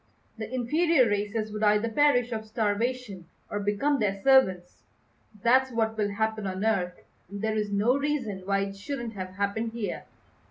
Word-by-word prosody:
The 220 Hz, +1 st, -5 dB
inferior 265 Hz, +3 st, +3 dB
races 210 Hz, +1 st, -1 dB
would 215 Hz, 0 st, -5 dB
either 210 Hz, +1 st, +3 dB
perish 245 Hz, 0 st, +3 dB
of 220 Hz, -1 st, -4 dB
starvation 215 Hz, -3 st, -2 dB, 0.2 s
or 205 Hz, -, -1 dB
become 210 Hz, +8 st, +1 dB
their 200 Hz, -2 st, 0 dB
servants. 190 Hz, -10 st, +3 dB, 0.6 s
That's 260 Hz, +3 st, +4 dB
what 220 Hz, -1 st, 0 dB
will 210 Hz, -2 st, 0 dB
happen 220 Hz, 0 st, -2 dB
on 190 Hz, +2 st, -3 dB
Earth, 180 Hz, -5 st, 0 dB, 0.3 s
and 200 Hz, +1 st, -7 dB
there 220 Hz, 0 st, 0 dB
is 210 Hz, -1 st, -1 dB
no 210 Hz, +6 st, +3 dB
reason 280 Hz, -9 st, -1 dB
why 195 Hz, 0 st, +1 dB
it 195 Hz, 0 st, -4 dB
shouldn't 235 Hz, +3 st, -5 dB
have 185 Hz, -2 st, -7 dB
happened 205 Hz, +3 st, -2 dB
here." 230 Hz, -3 st, -4 dB
220 Hz, 165 wpm, -27 LUFS, 200-245 Hz, 0.6 s, That's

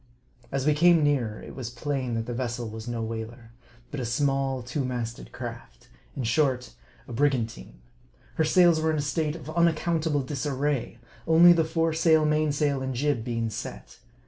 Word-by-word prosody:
As 135 Hz, -1 st, -1 dB
we 150 Hz, -, +4 dB
came 165 Hz, +1 st, +5 dB
nearer, 125 Hz, -8 st, 0 dB
it -, -, -9 dB
was 125 Hz, -4 st, -5 dB
plain 130 Hz, 0 st, -3 dB
that 115 Hz, 0 st, -2 dB
the 120 Hz, -, -4 dB
vessel 120 Hz, -1 st, -3 dB
was 110 Hz, +1 st, -8 dB
no 120 Hz, -1 st, -3 dB
whaler; 115 Hz, +1 st, -6 dB, 0.4 s
but 145 Hz, -, -4 dB
a -, -, -2 dB
small, 135 Hz, +1 st, 0 dB
two 125 Hz, +4 st, -3 dB
magted 120 Hz, -2 st, -4 dB
craft; -, -, -9 dB, 0.3 s
in 135 Hz, -, -3 dB
short, 125 Hz, -, +1 dB, 0.3 s
a -, -, -8 dB
brigan 135 Hz, -2 st, +2 dB
tine. 115 Hz, -, -13 dB, 0.5 s
Her 160 Hz, -, +1 dB
sails 170 Hz, 0 st, +4 dB
were 160 Hz, -, +1 dB
in 155 Hz, -, +1 dB
a -, -, 0 dB
state 150 Hz, +1 st, -1 dB
of 155 Hz, -2 st, -8 dB
unaccountable 160 Hz, -3 st, +1 dB
disarray; 140 Hz, -2 st, -2 dB, 0.3 s
only 170 Hz, +2 st, +8 dB
the 165 Hz, -1 st, +2 dB
foresail, 160 Hz, -1 st, +2 dB
mainsail, 150 Hz, -2 st, +1 dB
and 130 Hz, -1 st, -3 dB
jib 140 Hz, -2 st, 0 dB
being 115 Hz, -2 st, -2 dB
set. -, -, -8 dB
135 Hz, 170 wpm, -26 LUFS, 120-155 Hz, 0.5 s, only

